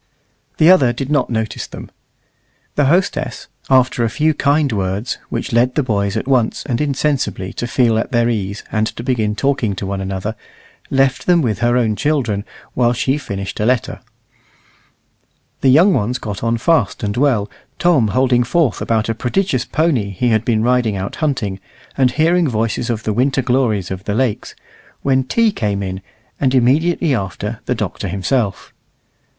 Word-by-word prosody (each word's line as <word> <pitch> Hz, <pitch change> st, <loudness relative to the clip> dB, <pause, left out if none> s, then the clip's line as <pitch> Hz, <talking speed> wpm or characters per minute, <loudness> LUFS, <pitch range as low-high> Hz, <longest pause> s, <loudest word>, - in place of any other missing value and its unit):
The 160 Hz, +3 st, +6 dB
other 135 Hz, -10 st, +4 dB
did 135 Hz, +3 st, -4 dB
not 145 Hz, -4 st, +1 dB
notice 110 Hz, -2 st, -3 dB
them. -, -, -10 dB, 0.8 s
The 145 Hz, -, +2 dB
hostess, 175 Hz, +7 st, 0 dB, 0.2 s
after 130 Hz, -1 st, +3 dB
a 115 Hz, -, +1 dB
few 155 Hz, +7 st, +1 dB
kind 145 Hz, -1 st, +1 dB
words, 100 Hz, +2 st, -2 dB
which 135 Hz, -, -4 dB
led 120 Hz, +2 st, +2 dB
the 150 Hz, -, +2 dB
boys 100 Hz, -5 st, -1 dB
at -, -, -3 dB
once 125 Hz, -5 st, +1 dB
and 125 Hz, -2 st, -1 dB
insensibly 140 Hz, -9 st, -1 dB
to 120 Hz, -, -4 dB
feel 115 Hz, -2 st, +2 dB
at -, -, -3 dB
their 120 Hz, -1 st, +2 dB
ease 100 Hz, -3 st, -2 dB
and 110 Hz, 0 st, +1 dB
to 115 Hz, -, -7 dB
begin 110 Hz, -5 st, 0 dB
talking 130 Hz, -6 st, 0 dB
to 95 Hz, -, -5 dB
one 95 Hz, 0 st, -3 dB
another, 95 Hz, +3 st, -4 dB, 0.5 s
left 135 Hz, -1 st, +1 dB
them 175 Hz, -3 st, +4 dB
with 110 Hz, -6 st, -1 dB
her 120 Hz, +1 st, +2 dB
own 110 Hz, -3 st, +1 dB
children 120 Hz, -8 st, -1 dB, 0.3 s
while 120 Hz, -1 st, +2 dB
she 135 Hz, +4 st, 0 dB
finished 100 Hz, -7 st, -5 dB
a 105 Hz, -, +1 dB
letter. 125 Hz, -1 st, 0 dB, 1.6 s
The 135 Hz, -, +3 dB
young 170 Hz, +9 st, +6 dB
ones 120 Hz, 0 st, 0 dB
got 105 Hz, -5 st, -6 dB
on 115 Hz, 0 st, +1 dB
fast 125 Hz, -6 st, +1 dB
and 100 Hz, 0 st, -1 dB
well, 125 Hz, -6 st, +2 dB, 0.3 s
Tom 160 Hz, -10 st, +3 dB
holding 125 Hz, +3 st, +2 dB
forth 140 Hz, -1 st, +1 dB
about 110 Hz, -2 st, 0 dB
a 115 Hz, -, 0 dB
prodigious 130 Hz, -, -1 dB
pony 145 Hz, -10 st, 0 dB
he 100 Hz, +6 st, -1 dB
had 110 Hz, -1 st, +2 dB
been 110 Hz, -2 st, +1 dB
riding 120 Hz, -3 st, +2 dB
out 95 Hz, 0 st, -5 dB
hunting, 125 Hz, -, -1 dB, 0.4 s
and 130 Hz, -2 st, +3 dB
hearing 165 Hz, +4 st, +2 dB
stories 115 Hz, 0 st, -1 dB
of 110 Hz, -2 st, -2 dB
the 110 Hz, -, -1 dB
winter 130 Hz, +3 st, +1 dB
glories 120 Hz, -7 st, 0 dB
of 95 Hz, 0 st, -6 dB
the 105 Hz, -, -1 dB
lakes, 120 Hz, -3 st, -1 dB, 0.5 s
when 130 Hz, -1 st, +2 dB
tea 230 Hz, -, +2 dB
came 105 Hz, -, -2 dB
in, 95 Hz, 0 st, -5 dB, 0.4 s
and 135 Hz, -1 st, +1 dB
immediately 150 Hz, +6 st, +2 dB
after 105 Hz, +1 st, -3 dB
the 125 Hz, -, 0 dB
Doctor 105 Hz, -2 st, -4 dB
himself. 100 Hz, +3 st, -2 dB
120 Hz, 175 wpm, -18 LUFS, 105-135 Hz, 1.6 s, The